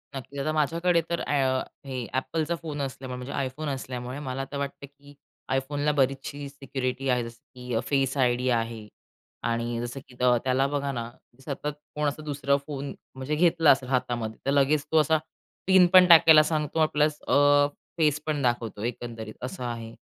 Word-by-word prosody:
नक्कीच, 140 +2 -7
आता 145 +3 0
माझ्याकडे 170 +3 +2
तर 170 - -1
अ, 130 -2 +1 0.3
हे 130 -2 -4
एपलचा 160 +5 -1
फोन 150 -3 -5
असल्यामुळे, 130 -1 -5
म्हणजे 125 +2 -6 0.2
iPhone 145 +2 -4
असल्यामुळे, 130 0 -6
मला 135 -1 -4
तर 145 - -4
वाटतं 140 0 -5
की 145 +1 -18 0.4
iPhoneला 145 +3 0
बरीचशी 135 +1 -1
सिक्युरिटी 135 -1 -4
आहे. 125 -1 +2
जसं 115 0 -9 0.2
की 125 -1 -5
फेस 135 -1 +1
आयडी 125 -1 +2
आहे 115 -2 -1 0.6
आणि 115 0 -1
जसं 120 +3 -5
की 125 - -16
त्याला 125 +2 +3
बघा 140 0 -2
ना, 120 -3 -4 0.4
सतत 145 0 -4 0.3
कोण 150 0 0
असा 145 +2 -3
दुसरा 140 -2 0
फोन 140 -2 -5 0.2
म्हणजे 130 +3 -3
घेतला 165 -1 +5
असेल 130 -1 +1
हातामध्ये, 120 -4 -1
तर 135 - +2
लगेच 140 +1 +3
तो 160 - +3
असा 155 +2 +3 0.5
पिन 190 -2 +7
पण 185 -1 +9
टाकायला 160 -2 +9
सांगतो 155 0 +1
प्लस 150 0 +2
अ, 145 0 +5 0.3
फेस 155 -2 +2
पण 150 -2 -1
दाखवतो, 120 -4 -1
एकंदरीत 115 -2 -5
असं 125 0 -5
आहे. 115 -2 -5
135 Hz, 165 wpm, -26 LUFS, 125-150 Hz, 0.6 s, पण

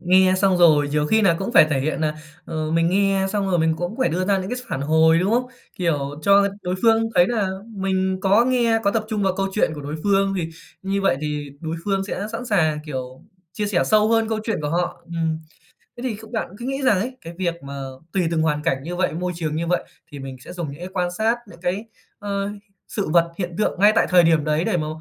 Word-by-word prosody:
nghe 185 +1 +4
xong 190 -1 +3
rồi 150 -4 +5
nhiều 150 0 0
khi 220 +6 +3
nà 170 -4 +4
cũng 200 +5 -3
phải 155 - +7
thể 135 -2 +1
hiện 155 +3 -2
nà, 155 -1 0 0.3
ờ, 155 -1 -3
mình 165 +1 +2
nghe 195 0 +2
xong 200 -2 0
rồi 175 - +2
mình 160 0 +2
cũng 175 +6 -4
phải 260 - +2
đưa 185 +3 -1
ra 200 -1 +2
những 185 +1 -5
cái 250 - -2
phản 135 -7 -3
hồi, 160 +3 +4
đúng 190 +4 +1
không? 250 +1 +2 0.3
Kiểu 145 -4 -1
cho 200 0 +5
đối 180 +1 -2
phương 225 -1 +5
thấy 175 0 +6
nà 215 -5 0 0.3
mình 190 -1 0
có 200 +5 +4
nghe, 240 -3 +2
có 200 - +4
tập 220 0 -1
trung 210 -2 -1
vào 190 -1 +1
câu 195 0 0
chuyện 210 - +2
của 145 - -7
đối 145 +2 -5
phương. 195 -1 +2
Thì 165 -1 -2 0.3
như 195 +1 -1
vậy 165 -9 +3
thì 150 -1 -3
đối 160 0 -4
phương 195 -1 0
sẽ 205 +1 -4
sẵn 245 +2 -5
sàng, 160 -8 +2
kiểu, 130 -3 -6 0.3
chia 210 +1 -2
sẻ 195 -4 +1
sâu 215 0 +3
hơn 225 -1 +2
câu 220 -1 -1
chuyện 225 - -1
của 145 - -2
họ. 175 +1 -2
Ừm, 165 -1 -2 0.6
thế 240 - -8
thì 250 -4 -2
kh 220 +1 -13
bạn 220 - -2
cứ 240 - -7
nghĩ 270 +1 -2
rằng 210 -7 +4
ấy, 255 +5 -4
cái 165 - -9
việc 170 -2 0
mà 140 0 -7 0.3
tùy 190 -2 +1
từng 160 -1 +1
hoàn 150 -2 0
cảnh 135 -5 0
như 175 +3 -5
vậy, 185 - 0
môi 180 +2 -2
trường 155 -2 -2
như 170 +1 -2
vậy, 180 - 0 0.3
thì 145 - -7
mình 135 -1 -7
sẽ - - -9
dùng 170 -5 -4
những 145 - -11
cái 180 - -5
quan 180 -2 -1
sát, 220 +6 0
những 170 -3 -14
cái, 185 +4 -2 0.3
ờ, 200 -1 -3 0.4
sự 200 -6 -3
vật, 170 +1 +3
hiện 175 -2 -3
tượng 210 - 0
ngay 210 +1 +7
tại - - +4
thời 180 -1 +7
điểm 160 -2 +3
đấy 155 +2 +1
để 180 - +1
mà, 155 -2 -2
180 Hz, 255 wpm, -22 LUFS, 160-205 Hz, 0.6 s, phải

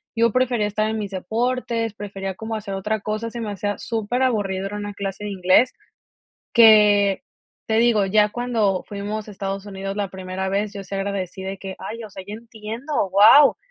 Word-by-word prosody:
yo 230 -1 +3
prefería 245 -3 +1
estar 215 +1 -1
en 220 - -2
mis 205 -1 -4
deportes, 230 +3 -1
prefería 195 -2 -5
como 220 +2 -5
hacer 205 -2 -5
otra 210 +3 -2
cosa. 215 +2 -3
Se 235 - -6
me 215 -2 -3
hacía 205 +1 -3
superaburrido 220 -4 -1
ir 200 - -8
a 210 - -3
una 205 0 -5
clase 195 0 -5
de - - -3
inglés 190 +6 +3 0.8
que, 210 -3 +6 0.4
te 220 0 +1
digo, 230 -4 +3
ya 210 +2 +4
cuando 225 -6 0
fuimos 210 +1 -5
a - - -8
Estados 195 0 -4
Unidos 195 0 -5
la 200 -2 -1
primera 190 0 -4
vez, 205 +1 -1
yo 200 -1 -6
sí 195 - -10
agradecí 195 -2 -3
de 195 +1 -5
que: 190 0 -7
"Ay, 230 +1 -6
o 215 - -8
sea, 190 -1 -9
yo 210 - -6
entiendo, 230 +4 -4
wao". 220 +9 +7
210 Hz, 195 wpm, -22 LUFS, 195-225 Hz, 0.8 s, wao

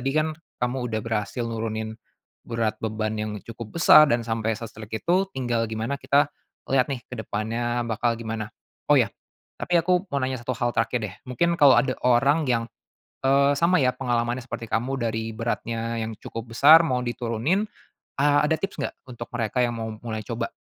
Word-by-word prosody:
tadi 135 +2 -1
kan 155 0 +2 0.2
kamu 125 0 -2
udah 110 -1 -2
berhasil 115 +2 -2
nurunin 110 -1 -3 0.6
berat 115 -2 -1
beban 110 -1 -2
yang 110 0 -3
cukup 115 +4 -9
besar 155 -3 +8
dan 120 -2 +1
sampai 115 -1 -1
se-strict 110 -1 -7
itu, 185 +3 +2
tinggal 120 -3 0
gimana 110 +6 -3
kita 145 +1 +2 0.4
lihat 130 0 +3
nih 130 -4 -4
kedepannya 120 +1 -3
bakal 115 +1 0
gimana. 110 -2 -4 0.4
Oh - - +6
ya, - - +3 0.5
tapi 175 - +1
aku 180 +3 +2
mau 140 - -3
nanya 130 -2 -3
satu 120 0 -3
hal 120 +1 0
terakhir 115 +2 0
deh, 95 -3 -5
mungkin 170 +8 +1
kalau 140 -3 +8
ada 130 -2 +3
orang 140 +6 +4
yang, 115 -2 +2 0.6
eee, 140 +1 +4
sama 170 +3 +4
ya 125 -1 +3
pengalamannya 120 -1 -1
seperti 120 - -5
kamu 125 +5 0
dari 110 0 -2
beratnya 115 0 -2
yang 110 0 -4
cukup 115 +2 -8
besar 155 +3 +9
mau 125 -4 0
diturunin 120 - -1 0.5
a 145 +1 +4
ada 160 +1 +1
tips 195 - -3
gak - - -4
untuk 120 -1 -8
mereka 120 +1 0
yang 120 -1 0
mau 110 0 -3
mulai 110 -2 -4
coba? - - -3
120 Hz, 175 wpm, -25 LUFS, 115-135 Hz, 0.6 s, besar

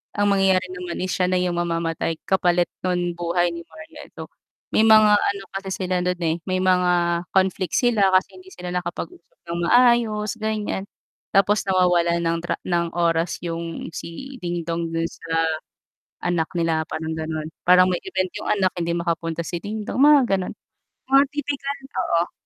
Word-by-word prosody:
ang 205 0 +2
mangyayari 190 -1 +3
naman 180 0 -5
is 185 - -2
siya 180 0 +1
na 185 - +1
yung 180 -1 0
mamamatay 165 -1 -1
kapalit 175 -2 +2
nun 175 -1 -1
buhay 175 0 0
ni 170 - -6
Marian. 310 -1 -12
So, - - -9 0.4
may 220 +1 +4
mga 215 -1 +7
ano 200 -1 -1
kasi 195 -1 -4
sila 185 0 0
dun, 180 0 0
eh, 165 +1 0
may 185 0 0
mga 180 -1 +3 0.4
conflict 190 -2 +1
sila 230 -5 +3
kasi 185 0 +1
hindi 185 - -17
sila 180 0 -6
nakapag-usap 180 - -6
nang 170 0 -4
maayos, 235 -3 +3
ganyan 210 -2 -2 0.4
tapos 200 +1 +3
nawawalan 175 -3 +2
ng 165 0 +1
tra 175 - -2
ng 170 -1 0
oras 170 0 +1
yung 165 0 -5
si 265 +12 -7
Dingdong 170 -1 -3
dun 165 0 -1
sa 165 -1 -2 0.8
anak 175 -2 0
nila, 165 -2 0
parang 160 0 -4
gano'n. 155 -1 -4 0.2
Parang 180 +1 +6
may 180 - +1
event 185 -1 -1
yung - - -7
anak 195 -3 +2
hindi 170 -1 -1
makapunta 170 -1 -2
si 175 +1 -4
Dingdong, 210 +6 -5
mga 290 +1 +7 0.2
gano'n. 185 - -4 0.5
Mga 275 +1 +6
tipikal 285 -1 -3 0.3
oo. 170 +1 0
180 Hz, 165 wpm, -23 LUFS, 170-200 Hz, 0.8 s, mga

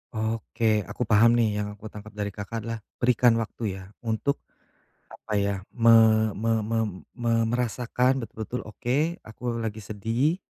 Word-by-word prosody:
Oke 110 -2 0
aku - - -3
paham 115 +1 +5
nih 110 -3 +2
yang 105 - -2
aku 105 +1 -10
tangkap 105 0 -11
dari 105 -1 -2
Kakak 105 +3 -5
adalah 115 0 -4 0.2
berikan 120 -1 +4
waktu 110 -3 -3
ya 95 - -9 0.2
untuk 115 +5 -1 0.7
apa - - -8
ya, 100 -1 +1 0.2
me 115 -2 +6
me 115 +2 0
me 115 +2 -1 0.4
me 120 -1 0 0.2
merasakan 125 +2 +1
betul-betul, 110 +2 -5
oke 135 - -1
aku 115 +2 -4
lagi 110 -1 -3
sedih, 115 - 0
115 Hz, 150 wpm, -26 LUFS, 105-120 Hz, 0.7 s, me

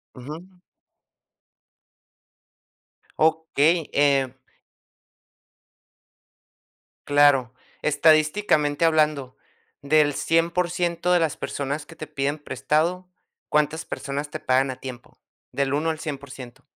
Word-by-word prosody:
Ujú. 150 +6 -8 2.7
Okey, 160 0 +2
em 140 -3 +2 2.7
Claro, 145 -4 +4 0.3
estadísticamente 155 0 +2
hablando, 150 -5 +1 0.5
del 145 +1 +3
100% 175 +2 0
de 180 - +4
las 165 -2 0
personas 145 +2 -4
que 165 - -13
te 155 - -7
piden 145 0 -2
prestado, 155 +6 -1 0.4
¿cuántas 150 +1 0
personas 145 +1 -5
te 155 - -6
pagan 130 0 +1
a 130 - -4
tiempo? 125 -1 -10 0.3
Del 140 -1 -1
1 155 +3 0
al 160 -1 -3
100% 135 -5 -8
150 Hz, 90 wpm, -24 LUFS, 140-160 Hz, 2.7 s, Claro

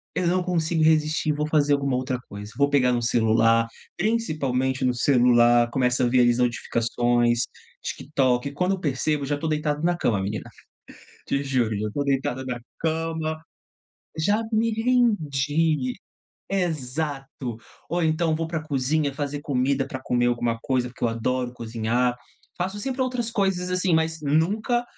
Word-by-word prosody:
eu 180 -1 0
não 180 +1 +2
consigo 165 -2 0
resistir 155 -1 +2
e - - +3
vou 150 +1 -1
fazer 145 -2 +3
alguma 140 -2 +1
outra 130 0 -1
coisa. 105 +1 -8
Vou 140 0 +3
pegar 125 -3 +4
no 120 -1 0
celular, 115 0 +3 0.3
principalmente 140 - 0
no 125 -1 +2
celular, 120 -2 +4
começa 125 0 +1
a 120 - +3
ver 125 0 +4
ali 120 0 +5
as 120 - -1
notificações, 120 0 +1 0.4
TikTok, 135 -2 0
quando 180 +6 0
eu - - -10
percebo 145 -1 -1
já 145 +1 -1
tô 160 - -3
deitado 150 0 -1
na 175 0 +2
cama, 110 - +1
menina. 100 +1 -4 0.8
Te 140 +1 0
juro, 120 -6 0
já 105 +1 -2
tô 145 - -1
deitado 135 -2 -1
na 125 -2 -3 0.2
cama 160 -1 -2 0.8
Já 205 +8 +2
me 225 +1 +2
rendi. 160 - +1 0.6
Exato, 145 - -3 0.3
ou 175 0 0
então 160 0 +1
vou 165 +1 -2
pra 160 -1 -3
cozinha 145 0 0
fazer 145 -1 -3
comida 135 0 0
pra 130 -1 -6
comer 120 -1 +1
alguma 120 -1 0
coisa, 125 -2 0
porque 120 - -17
eu - - +3
adoro 120 +2 -1
cozinhar. 120 +1 -1 0.4
Faço 190 +3 -2
sempre 260 +3 -3
outras 250 -3 -2
coisas, 190 -4 0
assim, 180 -1 +1
mas 160 0 0
nunca, 205 - +1
140 Hz, 160 wpm, -24 LUFS, 125-160 Hz, 0.8 s, ali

